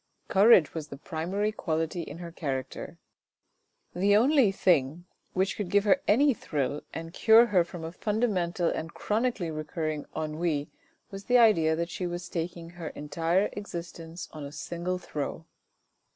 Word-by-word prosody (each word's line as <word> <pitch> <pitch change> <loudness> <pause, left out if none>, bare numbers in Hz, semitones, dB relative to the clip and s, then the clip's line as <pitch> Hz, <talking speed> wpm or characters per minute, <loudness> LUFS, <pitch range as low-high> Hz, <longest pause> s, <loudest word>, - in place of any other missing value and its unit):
Courage 195 -5 +6
was 155 -2 -5
the 140 - -9
primary 185 +7 -2
quality 165 -3 -2
in 155 -1 -8
her 170 -1 -8
character. 135 -6 -5 1.0
The 200 +3 +3
only 260 -2 +4
thing 170 -3 +1 0.3
which 190 +1 0
could 205 -4 -4
give 205 +1 +3
her 275 +7 +3
any 275 +6 +5
thrill 145 - -2
and 165 0 -7
cure 225 +3 +6
her 195 -7 +3
from 170 0 -9
a 160 - -5
fundamental 185 -4 0
and 165 +1 -3
chronically 215 -6 -1
recurring 155 -1 -4
ennui 155 -1 -2 0.4
was 195 0 -8
the 250 - +4
idea 170 -9 +5
that 170 +1 -3
she 180 - -3
was 175 0 -5
staking 170 0 -5
her 175 -2 -7
entire 165 +7 0
existence 170 -4 -7
on 155 - -8
a 140 - -7
single 170 +5 -3
throw. 160 -2 -5
170 Hz, 150 wpm, -28 LUFS, 160-200 Hz, 1.0 s, Courage